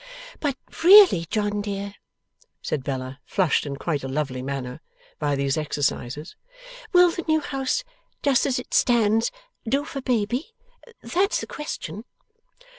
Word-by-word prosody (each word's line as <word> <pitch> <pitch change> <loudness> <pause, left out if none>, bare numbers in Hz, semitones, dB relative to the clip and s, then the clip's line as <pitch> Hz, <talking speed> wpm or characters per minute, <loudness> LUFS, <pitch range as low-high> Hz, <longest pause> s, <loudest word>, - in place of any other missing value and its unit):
'But 280 -3 -1 0.3
really, 365 - +8
John 205 +2 -1
dear,' 200 -1 -4 0.7
said 140 - -2
Bella, 130 -1 -4
flushed 180 -5 +1
in 140 - -4
quite 145 0 -2
a - - -3
lovely 135 -2 -2
manner 130 +1 -5 0.4
by 145 -2 0
these 140 0 0
exercises, 150 0 -2 0.6
'will 355 -2 +6
the 340 - -5
new 315 0 +3
house, 275 - -2 0.4
just 275 -3 +3
as 260 - 0
it 250 - -7
stands, 225 -2 +3 0.4
do 280 +4 +1
for 275 -3 -6
baby? 250 - -1 0.5
That's 390 +4 +1
the - - -4
question. 220 - -6
205 Hz, 135 wpm, -24 LUFS, -, 0.7 s, really